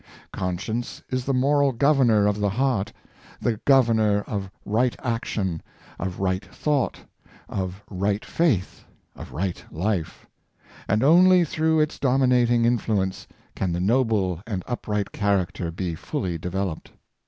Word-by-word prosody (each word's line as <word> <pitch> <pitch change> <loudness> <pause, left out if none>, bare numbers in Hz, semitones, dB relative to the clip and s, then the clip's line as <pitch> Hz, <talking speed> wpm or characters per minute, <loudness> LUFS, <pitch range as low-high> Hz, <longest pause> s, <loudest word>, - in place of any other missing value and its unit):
Conscience 100 +6 -3
is 130 -1 -1
the 140 - 0
moral 140 +2 +3
governor 125 -5 +3
of 105 0 +1
the 105 0 +1
heart 110 -2 0 0.3
— - - -23
the 115 -2 0
governor 115 -6 +4
of 100 -2 -4 0.2
right 115 +4 +1
action, 105 -7 -2 0.4
of 90 0 -4
right 95 0 0
thought, 145 +6 -1 0.5
of 95 +1 -4
right 100 +2 -1
faith, 135 - 0 0.3
of - - -10
right 90 +1 -3
life 90 0 -2 0.3
— - - -23
and 105 +4 +2
only 180 +4 +6
through 160 +1 +1
its 155 0 0
dominating 125 -3 +3
influence 105 -5 0 0.3
can 95 - -1
the 85 - -1
noble 100 -4 +1
and 95 -5 -3
upright 105 -4 -3
character 95 -3 0
be 85 +1 -3
fully 85 +2 -3
developed. 90 +1 -4
105 Hz, 135 wpm, -24 LUFS, 95-125 Hz, 0.5 s, only